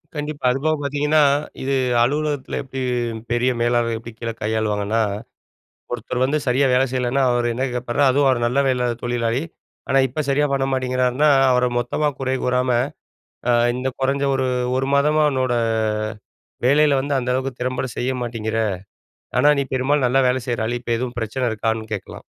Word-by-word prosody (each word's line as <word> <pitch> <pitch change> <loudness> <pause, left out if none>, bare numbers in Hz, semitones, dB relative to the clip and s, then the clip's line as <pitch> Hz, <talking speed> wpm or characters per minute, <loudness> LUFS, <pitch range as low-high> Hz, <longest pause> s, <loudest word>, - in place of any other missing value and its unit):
கண்டிப்பா, 150 0 -5
அது 130 - -1
போக 155 0 +3
பாத்தீங்கன்னா, 150 +2 +2 0.4
இது 135 +1 0 0.3
அலுவலகத்தில 145 +1 -1
எப்படி 135 -1 -6 0.5
பெரிய 120 +2 +2
மேலாளர் 120 -1 +1
எப்படி 115 0 -10
கீழே 115 -1 -3
கையாளுவாங்கன்னா. 110 0 0 0.9
ஒருத்தர் 120 +1 -3
வந்து 145 +4 +1
சரியா 130 +2 +2
வேலை 130 +1 +4
செய்யலைன்னா 130 +1 0
அவர் 120 0 +1
என்ன 120 +3 -2
கேப்பார் 125 +1 -3
அதுவும் 140 +2 +3
அவர் 130 -2 +2
நல்ல 125 +4 +1
வேலை 125 -2 +1 0.2
தொழிலாளி, 120 +1 0 0.5
ஆனா 135 - +3
இப்போ 155 +5 -3
சரியா 145 +2 +2
பண்ண 135 -1 +1
மாட்டேங்கிறாருனா 130 +2 +1 0.2
அவரை 125 0 +3
மொத்தமா 125 +5 -1
குறை 130 0 -1
கூறாம 125 0 +1 0.8
அ - - +5 0.2
"இந்த 125 +1 -2
குறைஞ்ச 135 +1 0
1, 130 -1 0 0.3
1 135 +1 0
மாதமா 150 +2 +3
உன்னோட 130 -2 0 1.1
வேலையில 145 +1 +4
வந்து 140 +2 -2
அந்த 125 -1 -2
அளவுக்கு 130 -1 -3
திறம்பட 130 +1 -1
செய்ய 130 +2 0
மாட்டேங்கிற. 115 -2 -3 0.8
ஆனா, 145 +3 +4
நீ - - +1
பெரும்பாலும் 130 +2 +2
நல்லா 135 +2 +3
வேலை 130 +1 +1
செய்கிற 120 -2 -1
ஆளு, 120 +2 -2
இப்போ 120 - -2
எதுவும் 125 0 -4
பிரச்சனை 120 +3 -2
இருக்கான்னு." 110 0 -2
கேட்கலாம், 95 -3 -7
130 Hz, 160 wpm, -21 LUFS, 120-135 Hz, 1.1 s, அ